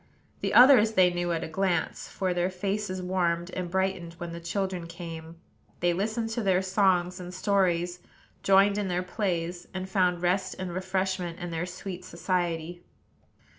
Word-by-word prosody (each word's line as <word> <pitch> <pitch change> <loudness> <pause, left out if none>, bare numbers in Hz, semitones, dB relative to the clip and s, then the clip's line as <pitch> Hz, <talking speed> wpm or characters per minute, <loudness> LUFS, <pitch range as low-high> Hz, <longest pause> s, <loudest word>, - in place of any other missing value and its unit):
The - - -1
others 245 -4 +8
they 180 -3 +5
knew 175 0 -1
at 165 0 -1
a - - -4
glance; 175 0 -1
for 185 -2 -2
their 175 +1 +1
faces 190 0 -3
warmed 175 -1 0
and 180 -1 -4
brightened 190 -2 -1
when 175 0 -7
the 170 - -6
children 180 0 -3
came, 165 -1 -8 0.4
they 175 0 +2
listened 220 +5 -2
to 235 - -1
their 190 -2 +2
songs 185 -2 +2
and 180 0 -7
stories, 180 -2 +1 0.4
joined 195 +1 +4
in 205 - -1
their 180 0 -1
plays, 175 -2 -2
and 185 0 -3
found 180 -2 +1
rest 185 +2 +1
and 185 -2 -4
refreshment 185 -1 -2
in 175 0 -5
their 165 +2 -2
sweet 180 0 -7
society. 175 -1 -2
180 Hz, 165 wpm, -28 LUFS, 175-190 Hz, 0.4 s, others